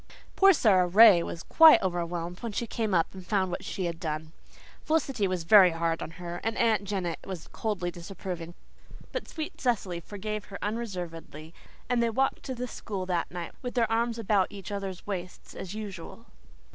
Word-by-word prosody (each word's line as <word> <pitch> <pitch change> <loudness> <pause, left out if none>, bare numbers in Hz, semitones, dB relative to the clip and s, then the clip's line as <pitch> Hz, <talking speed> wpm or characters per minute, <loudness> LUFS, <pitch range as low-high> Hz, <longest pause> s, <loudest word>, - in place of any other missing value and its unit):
Poor 390 0 +7
Sara 195 - +4
Ray 200 -1 +8
was 170 0 -5
quite 320 -1 +8
overwhelmed 175 -1 -3
when 230 -3 -5
she 235 - -1
came 225 -1 -2
up 165 - +1
and 190 -1 -9
found 190 -1 0
what 180 - -4
she 185 0 -3
had 170 -1 -3
done. 155 -1 -4 0.5
Felicity 275 -10 +1
was 185 -2 -2
very 185 +2 +8
hard 165 0 -1
on - - -4
her, 175 -1 -6
and 225 0 -1
Aunt 220 -3 +2
Janet 185 -4 -2
was 185 -4 -7
coldly 190 -5 -3
disapproving, 175 -1 -7 0.6
but - - -4
sweet 315 -2 -6
Cecily 200 -9 0
forgave 210 +4 -5
her 200 - -8
unreservedly, 175 -8 -5 0.3
and 245 -1 +1
they 235 - +2
walked 265 +4 0
to 260 - -4
the 250 +1 -4
school 200 -6 -5
that 175 -2 -1
night 175 -1 -6
with 245 -1 -5
their 230 -2 +2
arms 230 +1 +1
about 205 -4 +1
each 200 -1 -8
other's 195 -2 -5
waists 185 -3 -6
as 190 +2 -7
usual. 210 +1 -8
195 Hz, 185 wpm, -28 LUFS, 175-225 Hz, 0.6 s, Ray